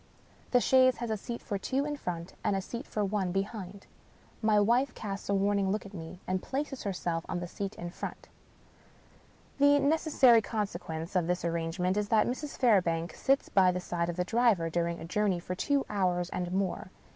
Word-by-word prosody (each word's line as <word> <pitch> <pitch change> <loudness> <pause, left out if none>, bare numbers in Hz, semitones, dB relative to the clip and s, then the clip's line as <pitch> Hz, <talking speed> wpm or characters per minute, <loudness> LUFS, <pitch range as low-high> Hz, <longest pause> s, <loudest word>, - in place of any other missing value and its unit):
The 250 - +4
chaise 255 +1 +4
has 235 -1 -3
a - - +1
seat 235 +3 -6
for 200 -3 -3
two 270 +8 -1
in 295 0 -2
front, 175 -8 -5
and 200 - +1
a 195 - 0
seat 235 +6 -6
for 210 -1 -1
one 195 -2 -1
behind. 195 0 -4 0.6
My 215 -2 +4
wife 240 +6 +2
casts 200 -2 -6
a 200 - +3
warning 200 0 +2
look 210 +2 -1
at 200 - -11
me, 165 -1 -8
and 185 0 -1
places 270 0 -3
herself 175 -4 -2
on 175 - -2
the 175 - -4
seat 195 +3 -5
in 175 0 -6
front. - - -7 1.3
The 285 0 +6
necessary 280 -5 +4
consequence 185 -6 -4
of 175 -2 +2
this 180 0 -1
arrangement 170 +3 -1
is 205 -1 -1
that 215 -1 +4
Mrs. 275 +4 -4
Fairbank 175 - +2
sits 275 +1 +1
by 185 -2 +4
the 180 - -2
side 175 -1 -2
of 170 - -3
the 180 0 -1
driver 215 -7 +2
during 170 0 -1
a - - -7
jour 210 +5 0
ney 185 -3 +1
of 180 +1 -5
two 280 +9 +1
hours 180 -3 0
and 180 -1 -3
more. 190 -1 -1
195 Hz, 200 wpm, -30 LUFS, 175-235 Hz, 1.3 s, The